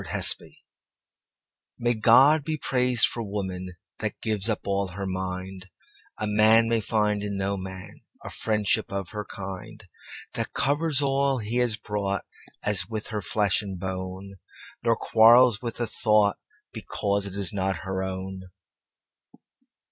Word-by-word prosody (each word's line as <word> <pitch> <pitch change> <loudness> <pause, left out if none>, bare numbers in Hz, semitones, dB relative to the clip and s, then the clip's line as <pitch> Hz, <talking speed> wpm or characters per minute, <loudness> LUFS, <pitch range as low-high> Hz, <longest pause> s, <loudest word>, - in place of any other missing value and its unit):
On - - -10
Woman - - +4 1.3
MAY 120 0 +1
God 130 +7 +5
be 155 +1 -3
praised 125 -4 +3
for 120 - -3
womanThat 95 -4 -6
gives 110 -1 0
up 110 - -1
all 100 0 -1
her 100 +1 -5
mind,A 95 +1 -7
man 110 +2 +6
may 115 0 +1
find 105 -1 0
in 100 -1 -4
no 100 +1 -1
manA 95 -1 -8 0.4
friendship 105 -3 0
of 100 -2 -4
her 105 0 -5
kindThat 105 0 -9
covers 145 +1 +1
all 135 0 +1
he 115 +1 -3
has 120 -3 +1
broughtAs 105 -1 -3
with 110 -1 -5
her 105 -2 -3
flesh 100 +3 +1
and 95 -3 -7
bone, 95 +1 -6 0.4
Nor 115 -1 +2
quarrels 115 0 +5
with 115 -1 -6
a - - 0
thoughtBecause 100 -1 -1
it 95 - -8
is 100 -2 +1
not 95 -2 -1
her 95 0 -3
own. 95 0 -6
105 Hz, 130 wpm, -25 LUFS, 95-115 Hz, 1.3 s, man